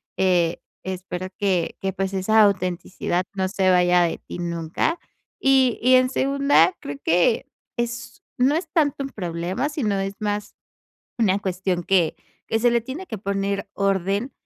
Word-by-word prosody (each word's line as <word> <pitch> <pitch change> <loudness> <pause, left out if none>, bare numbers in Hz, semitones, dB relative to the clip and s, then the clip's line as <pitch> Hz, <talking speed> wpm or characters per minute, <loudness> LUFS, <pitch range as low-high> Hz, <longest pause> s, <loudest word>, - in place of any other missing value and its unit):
Eh, 175 -3 +2 0.2
espero 185 0 -5
que 190 -4 0
que 195 - -1
pues, 195 +1 -3
esa 215 +4 +3
autenticidad 180 -2 0
no 190 -1 -1
se 190 -1 +1
vaya 180 0 +4
de 170 - -1
ti - - -9
nunca. 170 - -1 0.4
Y 265 -3 +3
y 255 +2 +5
en 255 0 +4
segunda, 280 +6 +3
creo 145 - -6
que, 175 +9 +2 0.3
es 235 +10 -4 0.2
no 255 +3 +3
es 330 +1 -2
tanto 285 -4 +1
un 275 - -4
problema, 180 - -3
sino 220 -10 -1
es 195 +1 -3
más 210 0 -3 0.6
una 200 -4 +3
cuestión 185 -2 -2
que 180 -4 +2 0.3
que 225 - 0
se 240 +2 +3
le 235 -1 +2
tiene 275 +11 -7
que 225 - -5
poner 200 0 -2
orden, 195 +4 0
195 Hz, 160 wpm, -23 LUFS, 180-240 Hz, 0.6 s, y